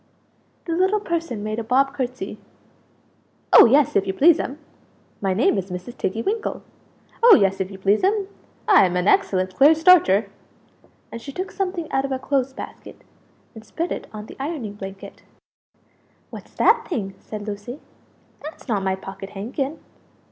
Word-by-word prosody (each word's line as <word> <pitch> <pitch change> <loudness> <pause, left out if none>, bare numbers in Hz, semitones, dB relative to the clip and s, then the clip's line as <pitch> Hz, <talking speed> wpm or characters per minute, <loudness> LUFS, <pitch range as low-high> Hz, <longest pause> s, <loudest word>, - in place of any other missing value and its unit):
The 335 - -2
little 380 +4 +2
person 335 - -3
made 215 +1 -3
a - - -3
bob 270 +4 +2
curtsey 250 -6 -5 1.1
"Oh, - - +10
yes, 270 +3 +3
if 195 - +2
you 190 - -1
please'm; 295 - +3 0.6
my 195 -2 0
name 210 -1 +2
is 190 0 -6
Mrs. 180 +6 -7
Tiggy 220 +5 -3
winkle; 435 +2 -3 0.6
oh, 470 0 +9
yes 195 -1 +2
if 190 - -3
you 195 - -10
please'm, 370 - +1 0.4
I'm 190 - +5
an 180 +1 0
excellent 185 -2 +2
clear 290 +9 +6
starcher!" 315 - +5 0.8
And 230 - -7
she 275 - -8
took 370 +7 -5
something 365 -4 -3
out 270 - +1
of 275 - -4
a 265 - 0
clothes 270 0 -1
basket, - - -11 0.5
and 220 - -12
spread 335 +9 -4
it - - -5
on 210 -1 -8
the - - -13
ironing 270 -7 -4
blanket. 195 -1 -10 1.1
"What's - - -11
that 460 +1 +3
thing?" 200 - -3
said 210 -1 -8
Lucie 210 +6 -7 0.6
"that's 305 0 -10
not 210 -5 0
my 190 0 0
pocket 195 +1 -9
handkin?" 265 +8 -4
240 Hz, 160 wpm, -22 LUFS, 195-320 Hz, 1.1 s, Oh